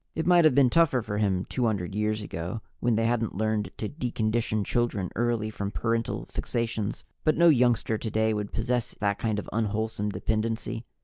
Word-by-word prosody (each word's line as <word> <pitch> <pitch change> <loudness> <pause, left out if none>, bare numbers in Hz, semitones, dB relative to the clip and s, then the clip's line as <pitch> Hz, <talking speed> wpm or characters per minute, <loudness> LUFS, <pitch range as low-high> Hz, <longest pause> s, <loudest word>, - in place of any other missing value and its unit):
It 160 - -1
might 175 -1 +6
have 155 - +5
been 135 -3 +5
tougher 155 -8 +3
for 105 -1 -3
him 95 -3 +1
200 105 -7 -1
years 105 +1 -1
ago, 90 +4 -5 0.2
when 120 -2 +2
they 115 +1 +1
hadn't 115 -3 0
learned 110 -2 0
to 110 - -3
decondition 110 -5 -1
children 110 -6 0
early 115 -2 0
from 100 -2 -3
parental 115 +2 -1
fixations. 115 -3 -3 0.2
But 155 - +2
no 170 +1 +7
youngster 120 -5 +3
today 110 0 0
would 105 -1 -3
possess 120 +2 -1
that 100 -1 -1
kind 110 -2 0
of 105 - -4
unwholesome 110 -1 -1
dependency. 110 +3 -2
110 Hz, 175 wpm, -27 LUFS, 105-120 Hz, 0.2 s, no